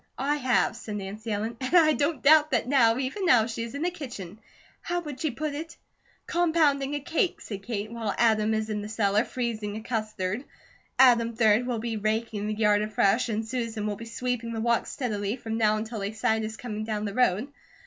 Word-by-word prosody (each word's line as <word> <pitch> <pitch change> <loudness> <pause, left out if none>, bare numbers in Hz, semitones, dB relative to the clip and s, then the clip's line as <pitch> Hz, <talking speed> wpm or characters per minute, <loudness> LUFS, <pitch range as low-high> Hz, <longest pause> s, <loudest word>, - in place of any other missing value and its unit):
"I 285 +3 0
have," 255 -4 +2
said 220 -3 -6
Nancy 210 +3 -5
Ellen. 220 +3 -2
"And 260 +7 0
I 315 -3 +6
don't 285 -2 -1
doubt 305 +1 +6
that - - 0
now, 240 -4 +4
even 270 +10 -3
now, 245 -11 +5
she 230 0 -5
is 230 +3 -5
in 285 - -3
the 355 - +1
kitchen 220 - -8 0.4
how 350 0 -2
would 295 -5 -7
she 315 - +1
put 290 +4 -3
it?" 325 +3 -7 0.5
"'Compounding 305 -5 +2
a - - -1
cake,'" 320 +5 -1
said 200 -3 -7
Kate, 215 0 -4
"while 225 -3 -3
Adam 220 -1 +3
is 220 0 -2
in 210 -1 -2
the 210 - -6
cellar 210 -1 +2
'freezing 220 -5 -3
a - - -6
custard.' 215 -1 -3 0.5
Adam, 235 -3 +5
3d, 225 +1 +4
will 245 -2 -1
be 225 0 -3
raking 215 0 -1
the 215 - -2
yard 210 -1 +3
afresh 215 +3 +2
and 220 0 -2
Susan 230 -3 -3
will 210 -1 -1
be 230 - -9
sweeping 235 0 -3
the 225 - -3
walks 235 +1 +1
steadily 210 -4 -2
from 225 -3 -4
now 215 -1 +3
until 220 +1 -4
they 200 +2 -3
sight 220 0 0
us 220 0 -5
coming 215 -3 -5
down 215 -1 -3
the 200 - -3
road. 245 +1 +2
230 Hz, 210 wpm, -27 LUFS, 215-260 Hz, 0.5 s, I